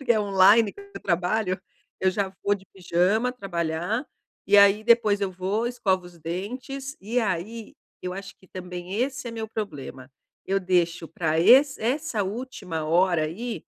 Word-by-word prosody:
porque 255 -4 +3
é 220 - +1
online 200 +2 +5
que - - -13
eu 400 0 -11
trabalho. 180 +2 0 0.4
Eu 190 - +3
já 195 0 -2
vou 205 - +3
de 195 -1 -10
pijama 190 +6 +1
trabalhar, 175 - -2 0.4
e 205 +1 +5
aí 200 +1 +6
depois 220 -3 +4
eu 195 -2 -1
vou, 195 +5 -1
escovo 195 -7 0
os 175 - -14
dentes, 255 - -5
e 230 +5 -1
aí, 215 +1 -3 0.3
eu 180 - -4
acho 195 +1 -8
que 185 - -21
também 180 0 -7
esse 270 0 -2
é - - -3
meu 225 -1 -5
problema, 145 -11 -6 0.4
eu 195 +1 +1
deixo 175 -2 0
pra 160 -1 0
esse 265 - +6
essa 250 -1 0
última 195 -6 -5
hora 170 0 +3
aí, 225 +10 -5
195 Hz, 165 wpm, -25 LUFS, 180-230 Hz, 0.4 s, aí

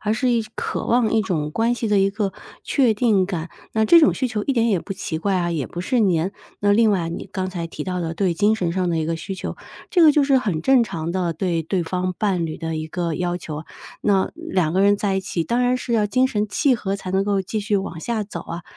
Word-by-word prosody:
而 210 0 0
是 250 +1 +1
一 230 -2 +2
渴 - - -3
望 235 -2 +2
一 225 - +3
种 165 -8 -2
关 230 +8 +1
系 235 -2 -3
的 205 -1 +3
一 195 0 +4
个， 200 -2 -2 0.3
确 255 -6 +2
定 205 -4 +2
感。 175 -3 -4 0.2
那 220 0 +2
这 335 +10 +7
种 305 - +5
需 260 - -1
求 215 -3 -2
一 275 - +1
点 230 -2 +2
也 190 -6 +2
不 195 - -6
奇 170 -4 -4
怪 195 +3 0
啊， 175 -1 0
也 155 -6 -2
不 175 - -6
是 245 +6 0
粘。 185 -2 +2 0.3
那 205 0 +3
另 220 0 +4
外 175 -4 0
你 180 - -6
刚 185 -2 -3
才 170 -2 -4
提 - - -7
到 180 -1 -2
的 165 -1 -3
对 180 0 +1
精 210 +4 +3
神 175 -5 -1
上 185 -1 0
的 170 - 0
一 155 - 0
个 165 +1 -1
需 195 +4 -6
求， - - -5 0.3
这 355 -3 +4
个 310 - +8
就 295 - +4
是 275 -1 +4
很 190 -11 -2
正 265 -3 +5
常 165 -4 -4
的 180 -3 0
对 170 -1 -1
对 175 +2 -1
方 180 +2 -2
伴 185 -6 0
侣 155 - -5
的 160 -1 -4
一 155 0 -4
个 170 -1 -2
要 175 +1 -1
求， 155 -2 -7 0.4
那 195 -2 +2
两 190 - -1
个 190 - +2
人 200 +1 +5
在 195 -2 0
一 - - 0
起， 175 -3 -2
当 235 +9 0
然 250 +1 +2
是 250 -1 -4
要 215 -2 +3
精 255 +5 +2
神 210 -4 -1
契 270 +4 +2
合 200 -3 -2
才 185 -1 -7
能 190 +1 +2
够 200 -2 +1
继 215 +3 -3
续 205 0 0
往 180 -4 -4
下 225 +3 -2
走 175 -4 -7
啊。 170 0 -7
195 Hz, 290 characters per minute, -22 LUFS, 175-220 Hz, 0.4 s, 个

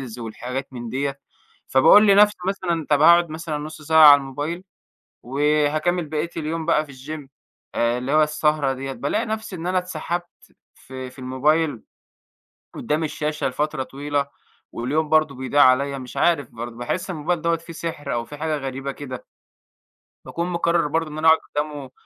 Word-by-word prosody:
الreels - - -18
والحاجات 125 +4 -6
من 120 -2 -6
دِيّة، 140 +3 -3 0.5
فباقول 205 +11 +6
لنَفسي 205 +1 +6
مثلًا، 175 -5 -1
طَب 145 - +3
هاقعُد 170 0 +6
مثلًا 155 -1 -4
نُص 155 +1 -8
ساعة 160 0 +7
على 145 -1 +10
الموبايل 145 +6 -5 0.6
وهاكمّل 150 +6 +1
بقية 155 +2 -2
اليوم 160 0 -3
بقى 155 -2 +2
في 140 - -13
الgym 140 +2 -8 0.5
آآ 120 +1 +1
اللي 125 +3 -3
هو 155 0 +5
السهرة 150 -2 +1
دِيّة 135 +1 -5
بالاقي 140 - -2
نَفسي 220 -3 -4
إن 170 0 -6
أنا 185 +1 +1
اتسحَبت 175 0 -4 0.5
في 130 -1 -9
في 130 - -20
الموبايل 135 +2 0 0.9
قُدّام 155 +2 -1
الشاشة 150 -1 -2
لفترة 145 +1 -2
طويلة 140 +1 -2 0.5
واليوم 150 +6 -1
برضه 155 -2 +3
بيضيع 130 +3 +2
عليَّ، 140 +2 +3
مش 130 -1 -10
عارف 155 -7 +1
برضه، 115 0 -7
باحس 120 +11 -3
الموبايل 170 0 -2
دَوّة 170 0 +2
فيه 165 +1 -11
سِحر 165 -2 -5
أو 120 -1 -2
فيه 145 - -10
حاجة 155 +1 -2
غريبة 135 0 -4
كده. 130 -2 -8 1.0
باكون 170 +1 -3
مقرّر 170 -1 +1
برضه 160 +1 -1
إن 150 - -7
أنا 160 +1 +3
أقعُد 160 0 +7
قُدّامة 145 -3 -5
150 Hz, 165 wpm, -22 LUFS, 135-165 Hz, 1.0 s, على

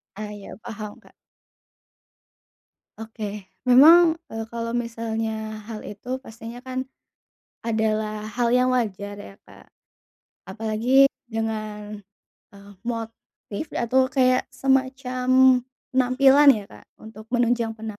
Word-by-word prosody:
Ah, 215 0 -6
ya. 205 -1 -10
Paham, 215 -3 -8
Kak. - - -21 1.9
Oke. 210 -3 -7 0.2
Memang, 320 +7 +8 0.2
eee, 225 0 -5
kalau 230 0 -3
misalnya 225 -2 -3
hal 220 -2 -7
itu 250 +6 -6
pastinya 230 +1 -10
kan 260 0 -4 0.8
adalah 215 -1 -1
hal 235 +1 0
yang 255 +1 +3
wajar 205 -4 -2
ya, 205 -1 -11
Kak. - - -17 0.8
Apalagi 225 +6 +3 0.2
dengan, 215 -2 -4 0.5
eee, 200 0 -14
motif 230 +1 -7
atau 260 +2 +2
kayak 255 -1 +2
semacam 260 -1 +2 0.3
penampilan 265 +3 +5
ya, 205 - -6
Kak, - - -16
untuk 220 0 -11
menunjang 235 -2 0
penam 220 -2 -7
230 Hz, 105 wpm, -24 LUFS, 215-255 Hz, 1.9 s, Memang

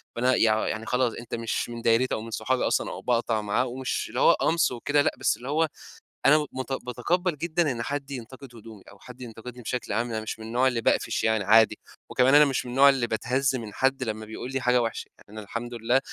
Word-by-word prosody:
فأنا 125 +2 +2
يع 110 -1 +2
يعني 110 0 -3
خلاص، 125 -1 0
أنت 115 0 -6
مش 115 0 -2
من 120 0 -7
دايرتي 115 +3 +2
أو - - -5
من 115 +1 -9
صحابي 125 +4 -1
أصلًا، - - 0
أو - - -7
باقطع 115 -3 0
معاه. 105 +5 0
ومش 130 +1 -3
اللي - - -4
هو - - +6
قَمْص 165 0 +1
وكده 145 +4 +1
لأ، - - +2
بس - - +1
اللي 125 +3 -8
هو 160 +2 +2 0.6
أنا 150 +2 +5
مت 130 +1 -5
باتقبّل 170 +7 -1
جدًا 170 -1 0
إن 120 -2 -4
حد 140 +1 -4
ينتقد 125 0 -9
هدومي، 110 -3 -13
أو 100 - -18
حد 125 0 -13
ينتقدني 120 +1 -9
بشكل 120 -2 -3
عام. 120 +3 -1
يعني 110 - -2
مش 110 - -5
من 110 - -8
النوع 125 +3 +2
اللي 120 -3 0
باقفش - - +1
يعني 110 -2 +1
عادي. 110 +3 +5 0.3
وكمان 130 +2 +4
أنا 150 - +8
مش 135 -3 -1
من 125 - -6
النوع 135 +3 +6
اللي 130 -3 +1
باتهز 130 +4 0
من 110 -4 -6
حد 135 0 +1
لمّا 110 -1 -4
بيقول 110 +4 -7
لي 135 -1 -2
حاجة 125 -1 +3
وحشة. 115 -1 -4 0.2
أنا 110 0 -8
الحمد 120 +4 -6
لله 120 +3 +1
125 Hz, 230 wpm, -26 LUFS, 115-130 Hz, 0.6 s, أنا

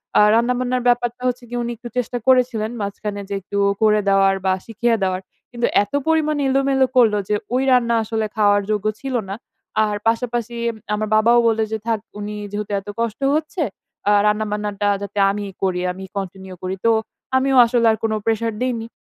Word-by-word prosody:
অ্যা - - +7
রান্না-বান্নার 250 +1 +1
ব্যাপারটা 240 0 +1
হচ্ছে 250 0 -2
গিয়ে, 245 0 -3
উনি 235 - -3
একটু 240 +2 -9
চেষ্টা 245 0 -1
করেছিলেন 250 -4 +3
মাঝখানে 200 0 -4
যে - - -3
একটু 200 +2 -5 0.2
করে 215 -1 +4
দেওয়ার, 195 0 +4
বা 190 - +3
শিখিয়ে 230 +1 0
দেওয়ার। 185 0 0 0.3
কিন্তু 240 -1 -1 0.2
এত 205 - -13
পরিমাণে 305 -2 +2
এলোমেলো 270 0 +3
করলো, 220 -4 +5
যে 210 - +2 0.2
ওই 260 - +2
রান্না 235 -2 +3
আসলে 220 0 -2
খাওয়ার 205 -1 +4
যোগ্য 210 -1 -1 0.2
ছিল 270 -2 -3
না। 195 - -3 0.5
আর 210 -1 -2
পাশাপাশি 235 0 -1 0.4
আমার 215 +1 -1
বাবাও 230 +2 +5
বলল 225 -1 +1
যে, 220 - -1
"থাক, 225 -2 +1 0.2
উনি 210 0 -5 0.2
যেহেতু 205 0 -4
এত 195 - -17
কষ্ট 230 +1 -2
হচ্ছে 315 +3 -2 0.4
অ্যা 205 - +4
রান্না-বান্নাটা 210 -1 -1
যাতে 200 0 -7
আমিই 205 -1 -5
করি, 180 -2 0
আমি 190 +1 -8
কন্টিনিউ 190 -1 -6
করি।" 185 +1 -2
তো 230 - +6 0.5
আমিও 270 0 +2
আসলে 235 0 +1
আর 220 - -1
কোন 225 - +1
প্রেশার 225 0 0
দেইনি। 235 -3 -1
225 Hz, 180 wpm, -20 LUFS, 205-245 Hz, 0.5 s, অ্যা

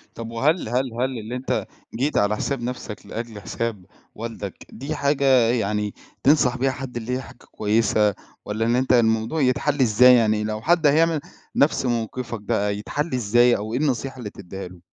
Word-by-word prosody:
طَب 115 -1 -6
وهل 140 +4 +1
هل 125 0 -1
هل 125 +1 -2
اللي 110 +3 -6
أنت 125 +1 -2 0.3
جيت 140 +6 0
على 105 +1 +2
حساب 135 +3 -2
نَفْسك 120 -3 -6
لأجل 115 -2 -6
حساب 105 -1 -4 0.3
والدك 110 -4 -7
دي 140 +7 -5
حاجة 140 0 +1 0.2
يعني 105 -3 0 0.3
تنصح 130 -3 +4
بيها 135 +1 +1
حد، 130 -2 -6
اللي 120 +2 -3
هي 130 - -3
حاجة 125 - -13
كويسة 105 -1 +2 0.3
والّا 110 +2 -1
إن 120 +1 +2
أنت 130 +1 +2
الموضوع 115 +5 +2
يتحلّ 140 +2 +1
إزاي، 125 +2 +7
يعني 110 -2 +2
لو 110 0 -3
حد 165 +2 +3
هيعمل 160 +2 +3 0.4
نَفْس 140 -1 +2
موقِفك 120 -1 -3
بقى 100 0 0
يتحلّ 150 +9 -3
إزاي 120 +1 +4
أو 110 +2 -5
إيه 125 - 0
النصيحة 135 -2 -1
اللي 120 -5 -6
تديها 95 -1 -8
له؟ 90 0 -14
120 Hz, 175 wpm, -23 LUFS, 110-130 Hz, 0.4 s, إزاي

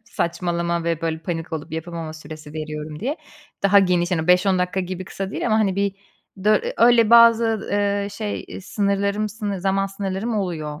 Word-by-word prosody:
saçmalama 170 -3 -2
ve 165 -1 -1
böyle 160 -1 -2
panik 165 0 -5
olup 160 +1 -5
yapamama 160 -1 -5
süresi 155 -1 -10
veriyorum." 150 0 -6
diye. 275 - -2 0.5
Daha 200 +1 +6
geniş, 180 -2 +2
hani, 160 -3 0
5-10 180 +1 +4
dakika 180 +1 0
gibi 185 0 -5
kısa 195 +1 -5
değil - - -3
ama, 220 -1 +3
hani, 195 -4 +1
bir 200 -1 0 0.5
dö 215 0 +5
eee, - - -4
öyle 235 -1 +5
bazı, 230 -2 +5
eee, 200 0 0
şey, 205 +1 -4
eee, - - -7
sınırlarım, 200 +1 0
sını 205 -2 -4
zaman 195 +1 +1
sınırlarım 195 +3 -3
oluyor, 155 -5 -4
190 Hz, 180 wpm, -22 LUFS, 165-205 Hz, 0.5 s, Daha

